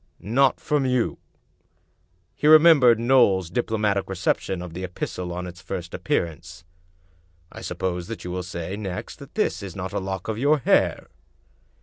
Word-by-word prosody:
"Not 130 +6 +2
from 150 -2 0
you?" 125 -2 0 1.1
He 150 - -1
remembered 155 -7 +7
Knowles's 115 -8 +3
diplo 115 +1 -1
matic 100 -2 0
reception 95 0 -1
of 90 -2 -9
the 90 +2 -6
epistle 90 0 -5
on 90 +1 -4
its 90 0 -9
first 90 -2 -6
appearance. 85 0 -3 0.4
" 85 0 -36
I - - -10
suppose 90 -1 -3
that 115 - -7
you 90 - -5
will 90 +1 -3
say 90 +1 -5
next 95 -4 -6
that - - -13
this - - 0
is 95 -3 -8
not 95 -1 -5
a 100 - 0
lock 95 -1 -5
of 110 0 -3
your 145 +4 +3
hair?" 135 - +2
95 Hz, 165 wpm, -24 LUFS, 90-115 Hz, 1.1 s, remembered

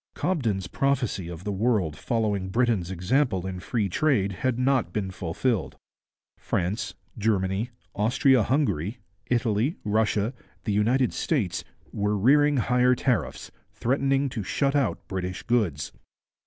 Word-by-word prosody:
Cobden's 115 - 0
prophecy 125 -10 0
of 85 0 -8
the 105 - -2
world 100 -6 +1
following 105 - -1
Britain's 115 -5 +1
example 95 - +1
in 95 -1 -4
free 105 +2 -1
trade 100 - +1
had 120 +5 -1
not 125 -7 +2
been 95 -1 -2
fulfilled. 95 +6 -2 0.6
France, 100 +2 -2 0.2
Germany, 100 +1 0 0.2
Austria 125 +4 +3
Hungary, 105 - 0 0.3
Italy, 120 - +1
Russia, 105 +1 +1 0.3
the 105 - -1
United 120 +5 +2
States, 110 - -1 0.3
were 105 0 0
rearing 145 +7 +4
higher 125 +1 +3
tariffs, 125 -3 -1 0.2
threatening 135 +2 +1
to 115 - -4
shut 140 +8 0
out 135 -7 0
British 90 -1 -4
goods. 105 - 0
110 Hz, 125 wpm, -26 LUFS, 95-130 Hz, 0.6 s, rearing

